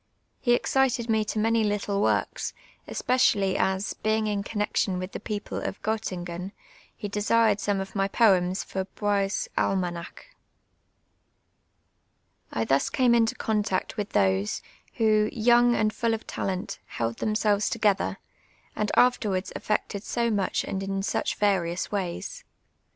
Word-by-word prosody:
He 240 - +3
excited 245 -2 +1
me 220 -1 +3
to 215 - -4
many 225 +1 +2
little 205 -1 0
works, - - 0 0.3
especially 205 -7 +2
as, 190 +1 0
being 215 0 0
in 205 -1 0
connexion 205 -2 -1
with 185 +1 -5
the - - -5
])eoj)le 210 -1 -4
of - - -5
Gottingen, 185 -4 -3 0.4
he 205 - -5
desired 210 +1 +2
some 205 -1 0
of 195 +1 -6
my 195 0 +2
poems 190 -4 +3
for 190 0 -4
lioie's 200 0 -1
Ahnanaclt. 175 -3 -2 2.3
I 115 - -1
thus 135 +3 +2
came 250 -2 +3
into 230 -1 +3
contact 210 -3 -1
with 210 -2 -3
those, 95 +1 +1 0.3
who, 215 -2 +3
young 240 +1 +4
and 215 0 +1
full 230 -1 +1
of 220 - -9
talent, 185 -1 -3
held 115 0 -3
themselves 215 -1 +1
together, 210 -4 +1 0.6
and 210 -1 -1
afterwards 210 -6 +2
effected 210 -1 -2
so 235 0 0
much 200 -3 0
and 195 - -3
in 195 0 -2
such - - -1
various 185 -4 0
ways. 200 - -4
205 Hz, 135 wpm, -26 LUFS, 190-220 Hz, 2.3 s, young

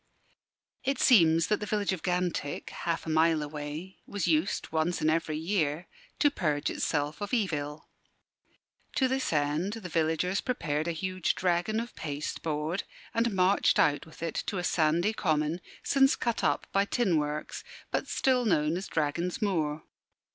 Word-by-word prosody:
It 270 0 0
seems 165 -8 +6
that 210 - +1
the 210 - -5
village 205 -2 0
of 180 - -5
Gantick, 180 -5 -2
half 165 -1 -3
a - - -4
mile 160 0 +3
away, 150 +5 -6
was 205 -4 -2
used 165 +3 +1
once 160 +2 0
in 155 - +2
every 160 -1 0
year 160 -2 -1 0.3
to 290 -3 +4
purge 150 - 0
itself 145 +5 -1
of 205 +4 -1
evil. 155 -8 -2 1.1
To 265 - +3
this 265 +1 -1
end 150 +6 0
the 220 -6 -6
villagers 165 +4 +1
prepared 155 - -1
a - - +1
huge 185 +1 -1
dragon 180 +5 +1
of 235 +1 -5
pasteboard 150 +3 -3 0.3
and 230 -2 +1
marched 185 +2 +3
out 145 +2 +2
with 160 - -11
it 165 - -2
to 200 - -2
a 180 - -2
sandy 170 +5 +2
common, 155 -3 0 0.2
since 270 0 +4
cut 235 -2 -1
up - - +1
by 195 0 +3
tin 200 -6 +1
works, 150 0 -3 0.3
but - - -1
still 255 -2 +2
known 165 -6 +2
as 190 - -5
Dragon's 165 +3 -1
Moor. 160 -7 0
170 Hz, 160 wpm, -29 LUFS, 155-200 Hz, 1.1 s, seems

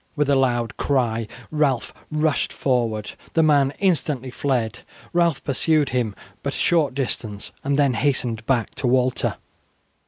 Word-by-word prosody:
With 145 -2 +1
a - - +5
loud 120 -3 +1
cry 115 -5 0 0.2
Ralph 145 -5 +1 0.2
rushed 155 -1 +1
forward. 115 -5 0 0.2
The 165 - +4
man 145 -3 +4
instantly 150 -9 0
fled. 125 -4 -1 0.3
Ralph 170 -4 +2
pursued 150 +2 +2
him 120 -5 -1 0.3
but - - -3
a - - -4
short 155 -6 +2
distance 110 -6 -3
and 140 0 +1
then 140 -3 +3
hastened 120 -4 0
back 125 -5 +1
to 130 - -1
Walter. 125 0 +1
135 Hz, 145 wpm, -23 LUFS, 120-145 Hz, 0.3 s, a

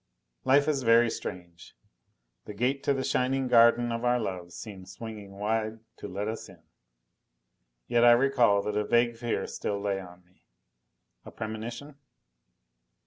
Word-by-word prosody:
Life 140 +2 +4
is 145 -3 +1
very 115 -1 +4
strange! 85 -2 -8 0.7
The 105 - -8
gate 130 +5 0
to 140 - +3
the 135 - -2
shining 130 +1 0
garden 120 0 +5
of 115 +1 -3
our 125 0 +2
love 90 -5 -5
seemed 95 -2 -10
swinging 105 -4 -9
wide 110 +1 -1 0.2
to - - -7
let 100 +3 -4
us 110 -1 -5
in. 85 -4 -17 1.2
Yet 120 - +2
I 120 0 +8
recall 120 -5 +3
that 105 - -3
a 105 - +1
vague 120 +1 +2
fear 115 0 -2
still 100 -1 -4
lay 100 -1 -1
on 90 -1 -13
me. 90 +1 -32 0.8
A - - -10
premonition? 115 +6 -7
115 Hz, 150 wpm, -28 LUFS, 100-120 Hz, 1.2 s, I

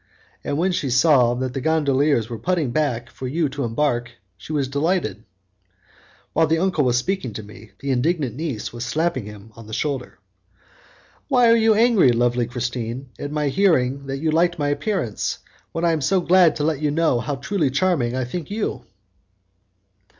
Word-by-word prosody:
And 145 - -2
when 185 +4 +1
she 150 -6 -1
saw 125 -2 +4
that 130 0 -3
the 135 - -3
gondoliers 145 -5 +2
were 115 -2 -6
putting 170 -8 0
back 125 -4 -1
for 130 - -6
you 155 +4 0
to 140 +1 -4
embark 120 0 0 0.3
she - - -11
was 145 -3 0
delighted." 145 - -1 1.1
While 160 0 +3
the 160 +2 +2
uncle 180 -3 +1
was 125 -1 +2
speaking 135 - -2
to 110 - -6
me, 105 0 -14
the 140 0 -2
indignant 135 -1 0
niece 145 -8 -4
was 120 0 -5
slapping 140 0 -1
him 105 +1 -11
on 115 -2 -12
the 110 - -9
shoulder. 135 0 -3 1.1
"Why 245 -4 +4
are - - +6
you 225 -1 +4
angry, 220 - +5
lovely 120 0 +1
Christine, 125 +1 -4
at 145 - -5
my 150 -1 0
hearing 140 -6 +1
that 135 0 -3
you 155 +2 0
liked 175 +2 +2
my 145 -2 0
appearance, 145 - -2 0.3
when 165 +1 -2
I 170 - +4
am 160 -2 -1
so 190 +7 +2
glad 175 -2 +4
to 145 - -2
let 155 -2 0
you 150 - +1
know 155 -4 +2
how 140 +4 -3
truly 150 +2 -1
charming 140 -4 +1
I 130 - -1
think 155 +5 -6
you?" 210 +1 -3
145 Hz, 185 wpm, -22 LUFS, 125-165 Hz, 1.1 s, are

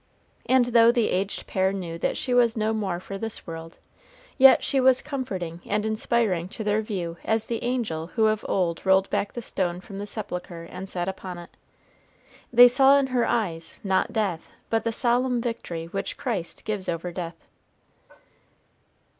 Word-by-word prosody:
And 255 -1 +4
though 235 -1 +6
the 240 -2 +1
aged 195 +2 -2
pair 190 0 +1
knew 175 -4 -5
that - - -1
she 255 - -1
was 240 -2 +3
no 220 0 +1
more 195 -5 -2
for 195 +2 -7
this 225 0 -5
world, 165 0 -8 0.6
yet 270 -1 +7
she 275 - +1
was 260 0 +5
comforting 190 - -5
and 210 +1 -1
inspiring 220 -5 0
to 220 - -3
their 210 +1 +1
view 180 -6 -4
as 220 0 +1
the 230 0 -3
angel 230 -11 -2
who 220 -2 +3
of 215 0 +1
old 170 -3 0
rolled 190 0 +4
back 200 - -1
the 240 - -6
stone 180 -4 -2
from 195 +1 -9
the 205 - -5
sepulchre 180 -5 -5
and 180 +3 -8
sat 175 -2 -3
upon 190 -1 -5
it. 175 0 -12 1.0
They 245 +1 +9
saw 270 +3 +6
in 280 - +2
her 245 -2 +2
eyes, 170 -8 -2
not 190 +2 +1
death, 200 -7 -2 0.2
but 225 0 +1
the 230 - +1
solemn 245 +2 +1
victory 230 -9 -4
which 195 +4 -4
Christ 200 -9 -3
gives 210 -4 -3
over 175 +1 -3
death. 170 -2 -7
205 Hz, 175 wpm, -25 LUFS, 180-235 Hz, 1.0 s, They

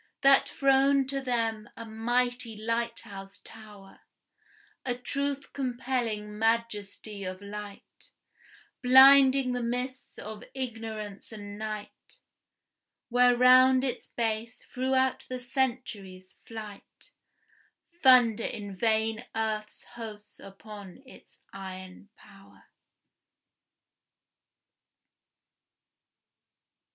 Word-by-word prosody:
That 275 0 +6
throne 275 0 +3
to 275 0 -1
them 225 -4 -2
a 230 - -7
mighty 240 +1 -1
lighthouse 225 -3 -4
tower, 210 -3 -13 0.8
A 245 -2 -1
truth 280 +2 -3
compelling 240 -5 -3
majesty 220 -2 -1
of 185 0 -5
light, 205 0 -10 0.7
Blinding 265 0 +7
the 245 0 -2
mists 250 +2 -4
of 215 0 -8
ignorance 225 -6 -6
and 205 -2 -8
night, 215 -1 -7 0.9
Where 245 0 +4
round 255 +1 +6
its 255 -2 -3
base 225 +1 -3
throughout 260 0 0
the 255 - -3
centuries' 240 -8 -3
flight, 215 -3 -10 0.9
Thunder 245 -4 +6
in 205 -2 -6
vain 220 +2 0
earth's 215 -1 -3
hosts 220 -3 -10
upon 200 +2 -12
its 260 - -18
iron 190 0 -9
power. 195 -1 -18
230 Hz, 85 wpm, -28 LUFS, 210-255 Hz, 0.9 s, Blinding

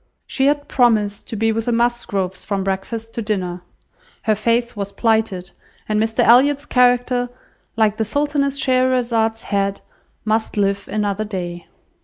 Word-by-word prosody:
She 265 0 +1
had 290 0 +1
promised 215 -5 +1
to - - -4
be 225 +1 +1
with 225 0 -2
the 240 - 0
Musgroves 230 -6 -1
from 200 -2 -2
breakfast 220 +4 -4
to 235 - -3
dinner. 185 -5 -2 0.6
Her 220 - +3
faith 235 +3 0
was 200 -1 -4
plighted, 215 -4 0 0.4
and 215 0 +1
Mr 220 0 +1
Elliot's 275 +4 +5
character, 245 -1 +2 0.5
like 215 -1 +2
the 220 - +1
Sultaness 280 +3 0
Scheherazade's 245 -4 +1
head, 200 -1 -1 0.4
must 220 0 0
live 200 -1 0
another 210 -1 -1
day. 175 -4 -5
220 Hz, 145 wpm, -20 LUFS, 200-245 Hz, 0.6 s, Elliot's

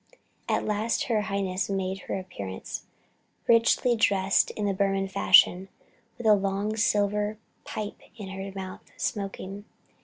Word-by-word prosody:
At - - +1
last 215 +2 0
her 220 -3 +1
Highness 195 -2 -2
made 190 -1 -2
her - - -1
appearance, 100 - -7 0.6
richly 235 +1 +4
dressed 195 -3 +3
in 210 - -3
the 200 - +1
Burman 195 0 +1
fashion, 190 0 +5 0.5
with 240 - -8
a 215 - +7
long 200 +1 0
silver 210 -1 +1 0.3
pipe 210 -1 -5 0.2
in 200 -3 -7
her 195 +1 -6
mouth, 190 -1 -6 0.2
smoking. 200 0 -4
200 Hz, 130 wpm, -27 LUFS, 195-210 Hz, 0.6 s, a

